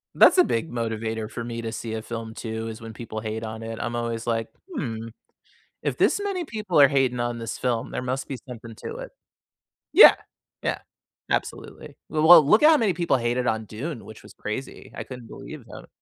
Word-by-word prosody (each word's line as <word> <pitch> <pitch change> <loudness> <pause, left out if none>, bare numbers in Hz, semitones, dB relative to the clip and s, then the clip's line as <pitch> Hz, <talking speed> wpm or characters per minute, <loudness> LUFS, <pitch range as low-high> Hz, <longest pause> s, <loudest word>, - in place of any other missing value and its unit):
That's - - +7
a 360 - +8
big 115 - -1
motivator 110 -2 -3
for 115 - -5
me 115 0 -5
to 115 -1 -4
see 110 0 -5
a 110 - -3
film, 115 0 -6
too, 110 -1 -5
is 110 0 -7
when 115 -1 -8
people 110 -1 -6
hate 110 +1 -4
on 110 0 -6
it, 115 0 -6
I'm 120 +1 -3
always 115 -1 -3
like, 115 -1 -1 0.3
"Hmm, 115 - -4 0.8
if - - -1
this - - +3
many 390 -3 -2
people 210 - 0
are 140 - +10
hating 130 -3 +1
on 120 0 -2
this 115 -1 -5
film, 120 -3 -1
there - - -3
must 130 +1 -3
be 135 - -4
something 115 -2 -9
to - - -5
it." - - -7 0.8
Yeah, - - +10 0.5
yeah, - - -1 0.5
absolutely, - - -4
well 155 0 +1
well, 170 -1 +11
look 215 - +5
at 305 - +9
how 320 - +7
many 220 -8 +2
people 170 -4 +2
hated 120 +1 0
on 110 -2 0
Dune, 120 +5 -6
which 110 - -12
was - - -14
crazy, 120 +6 -6
I - - -5
couldn't 125 -3 -9
believe - - -10
that. - - -11
115 Hz, 210 wpm, -25 LUFS, 115-135 Hz, 0.8 s, well